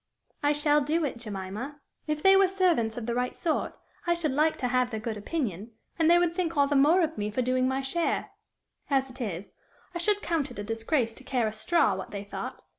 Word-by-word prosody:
"I 290 0 +3
shall 295 0 +3
do 310 +3 +1
it, 265 - -3
Jemima. 215 +6 -6 0.3
If 305 -1 -2
they 385 0 +7
were 390 0 +6
servants 350 - +1
of 235 - -4
the 235 - -1
right 250 +1 -1
sort, 325 -3 -1 0.3
I 345 - +3
should 330 -4 -1
like 305 +3 +2
to 250 - -1
have 250 0 +1
their 220 -3 -4
good 220 0 -4
opinion, 220 - -3 0.3
and 325 0 +4
they 345 - +7
would 345 -1 +2
think 340 -3 -2
all 285 - +5
the 285 +1 0
more 305 +7 +5
of 320 -4 -2
me 205 0 -1
for 250 +4 -1
doing 255 +1 +1
my 265 +1 0
share; 335 +5 -1 0.6
as 270 -2 +1
it 255 - -11
is, 195 -4 -4 0.4
I 345 - -3
should 410 +4 +1
count 320 -4 0
it - - -11
a 205 - -4
disgrace 225 +3 0
to 260 - -13
care 255 -3 0
a 215 - -2
straw, 335 +10 +2
what - - -5
they 200 -1 -5
thought. 200 - -7
270 Hz, 235 wpm, -28 LUFS, 230-325 Hz, 0.6 s, they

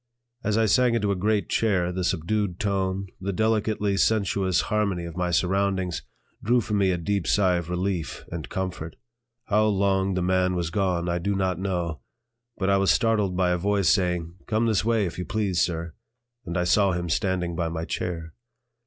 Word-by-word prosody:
As 105 +1 +1
I 115 - +3
sank 125 +2 +3
into 105 -3 +1
a - - +1
great 105 +2 0
chair, 95 -6 +1
the 90 0 -3
subdued 90 +2 -1
tone, 95 -2 -1
the 95 +1 -2
delicately 105 -1 0
sensuous 100 -4 +2
harmony 100 -5 -1
of 85 -1 -8
my 90 -1 -1
surroundings, 95 0 0 0.4
drew 120 +3 +3
from 105 -2 -1
me 95 -1 +3
a 90 - +1
deep 95 +1 -1
sigh 95 -3 +3
of 85 -1 -5
relief 90 -3 -2
and 80 -4 -5
comfort. 90 -4 -4 0.5
How 105 +1 +2
long 95 -2 +1
the 90 - 0
man 90 0 +2
was 85 -1 -2
gone 90 -3 0
I 85 0 0
do 100 +3 -1
not 95 -2 0
know, 90 -5 -2 0.6
but 95 - -1
I 100 0 +4
was 95 0 +2
startled 105 -6 +2
by 90 -1 +2
a 90 - 0
voice 100 -1 +2
saying: 90 -3 +1
"Come 110 +1 +1
this 110 -4 +2
way, 115 -2 +2
if 90 - -5
you 90 - -3
please, 105 -6 0
sir," 85 -1 -1 0.5
and 85 +1 -2
I 90 - +1
saw 95 +2 +3
him 85 0 -2
standing 90 0 -1
by 85 -1 -1
my 80 0 -4
chair. 80 -3 -4
95 Hz, 190 wpm, -25 LUFS, 90-100 Hz, 0.6 s, I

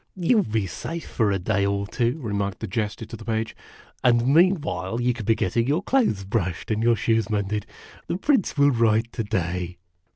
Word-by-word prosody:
o - - -40
" - - -51
You 235 - +5
'11 195 - +1
be 110 -3 +1
safe 165 - -6
for 110 -4 +1
a 100 - +1
day 100 +2 0
or 100 0 0
two," 120 +5 -1
remarked 100 -3 -2
the - - -4
Jester 105 +2 -3
to 115 - -9
the - - -10
Page; 110 -1 -2 0.2
" - - -26
and 120 -1 +4
meanwhile 155 - +2
you 125 0 +2
can 115 -3 -7
be 115 - +3
getting 115 +5 0
your 155 +7 +1
clothes 220 - +1
brushed 95 -2 -2
and 110 0 0
your 115 0 +4
shoes 115 -1 +1
mended. 105 -1 -1 0.4
The - - -1
Prince 245 - +1
will 145 0 +5
write 115 -1 +2
to 115 - -2
day." 90 -4 -2
115 Hz, 220 wpm, -24 LUFS, 100-125 Hz, 0.4 s, You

